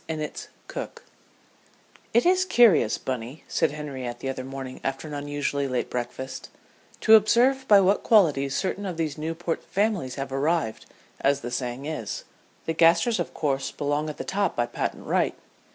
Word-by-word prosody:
INNITT'S 155 -1 -4 0.2
COOK - - -7 1.1
"It 235 +6 +3
is 370 +1 +4
curious, 235 - +4
Bunny," 130 +3 -5
said - - +1
Henriette 135 -5 -5
the 135 - -4
other 130 -1 -4
morning 135 -1 -7
after 135 +3 -3
an 150 - -7
unusually 145 -1 -2
late 125 -2 -2
breakfast, 125 +2 -5 0.5
"to 220 - +6
observe 245 +5 +5
by 205 -2 +8
what 195 +2 +3
qualities 145 - +3
certain 200 +1 -2
of 180 -3 -5
these 155 -2 -2
Newport 165 +1 -3
families 195 - -1
have 135 -1 -5
arrived, 140 -3 -1 0.3
as 140 0 +2
the 120 - -5
saying 125 +2 -3
is. 150 -9 -4 0.4
The 165 - -1
Gasters 170 +7 +4
of 175 - -4
course 140 -3 -1
belong 145 +1 -1
at 150 - -7
the - - -4
top 195 -2 -1
by 120 - +1
patent 120 - -4
right. - - +1
150 Hz, 165 wpm, -26 LUFS, 135-185 Hz, 1.1 s, by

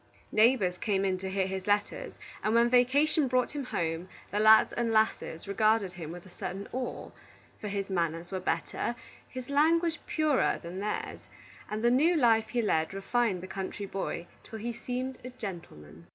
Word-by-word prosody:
Neighbors 215 -5 +3
came 195 -3 0
in 185 -1 0
to 190 0 -4
hear 190 0 0
his 190 0 -4
letters, 205 0 0 0.3
and 215 +1 +1
when 235 +1 +4
vacation 280 +4 +4
brought 250 0 +1
him 290 -3 -4
home, 165 -4 -2 0.2
the 205 - 0
lads 215 +1 +7
and 235 -1 0
lasses 215 -6 0
regarded 215 -1 +2
him 165 -3 -7
with 175 0 -9
a 185 - -14
certain 190 +3 -5
awe; 255 0 -4 0.5
for 210 - -5
his 200 -1 -2
manners 170 -1 -1
were 190 - -2
better, 235 +5 -2 0.3
his 255 -1 -7
language 325 +3 +3
purer, 305 -3 +2
than 175 +3 -6
theirs, 210 +1 -4 0.4
and 215 +1 -3
the 240 - +5
new 310 +8 +4
life 225 -6 +4
he 240 -2 0
led 160 -3 +1
refined 195 -1 0
the - - -6
country 195 +1 -5
boy 190 -3 -4 0.2
till 220 - -9
he 235 +2 -4
seemed 250 +2 -4
a 250 - -6
gentleman. 165 - -9
215 Hz, 180 wpm, -30 LUFS, 185-245 Hz, 0.5 s, lads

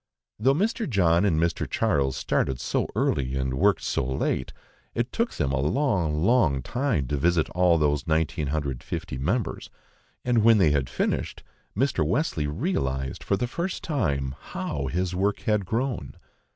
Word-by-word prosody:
Though 135 +5 +3
Mr. 220 - 0
John 90 -4 +3
and 80 -6 +2
Mr. 85 0 0
Charles 70 - +1
started 65 -2 0
so - - -1
early 65 -1 0
and 65 -1 -1
worked 100 +9 +2
so - - 0
late, 65 0 -1 0.4
it 120 +2 -1
took 230 +1 -1
them 65 - -1
a 70 - 0
long, 85 - +1
long 85 - +3
time 120 - 0
to 75 - 0
visit 85 +2 +2
all 90 -2 +3
those 75 -3 +1
1950 75 -5 -2
members, 100 - -2 0.6
and 120 -2 +3
when 110 0 +6
they 85 -7 +4
had 70 -3 0
finished, - - -2 0.3
Mr. 130 - +2
Wesley 80 - 0
realised 70 - -2
for 100 - +1
the 120 - 0
first 170 +9 -4
time 70 - -1
how 70 -2 -4
his 90 +4 -1
work 100 +3 0
had 105 -4 0
grown. 115 - -2
85 Hz, 155 wpm, -26 LUFS, 70-115 Hz, 0.6 s, when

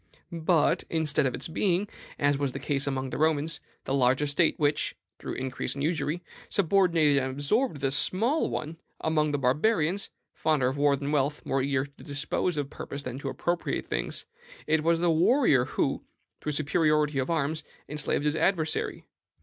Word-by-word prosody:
But, 165 -1 +2
instead 150 -3 +1
of 125 - -2
its - - -3
being, 185 +4 +1 0.3
as 145 0 +2
was 140 -2 -1
the 135 - -4
case 140 0 0
among 135 -1 -2
the - - -4
Romans, 155 0 +1 0.2
the 135 - -3
large 130 -1 +3
estate 150 +3 +2
which, 150 0 +1 0.2
through - - -5
increase 130 0 -3
and 140 - -3
usury, 165 +1 -1 0.3
subordinated 165 -6 +3
and 130 - -2
absorbed 145 - 0
the 135 -1 +1
small 225 - +2
one, 155 +2 -4 0.2
among 155 -1 +1
the 145 - 0
Barbarians 160 - +1 0.2
fonder 150 -5 +1
of 130 +2 -2
war 145 -1 +4
than 140 +1 -4
of - - -1
wealth, 145 +1 0
more 135 - 0
eager 135 0 0
to 140 +1 -16
dispose 145 +4 -2
of 145 -1 -3
persons 140 0 -6
than 125 0 -5
to 140 - -4
appropriate 175 +5 -2
things - - -2 0.4
it 160 -1 +2
was 165 0 +3
the 175 0 +3
warrior 165 - +4
who, - - -1 0.4
through 150 - -2
superiority 150 -1 +2
of 130 - -1
arms, 155 -1 -1 0.2
enslaved 150 0 -1
his 150 +1 +1
adversary. 160 -1 0
150 Hz, 175 wpm, -28 LUFS, 140-165 Hz, 0.4 s, war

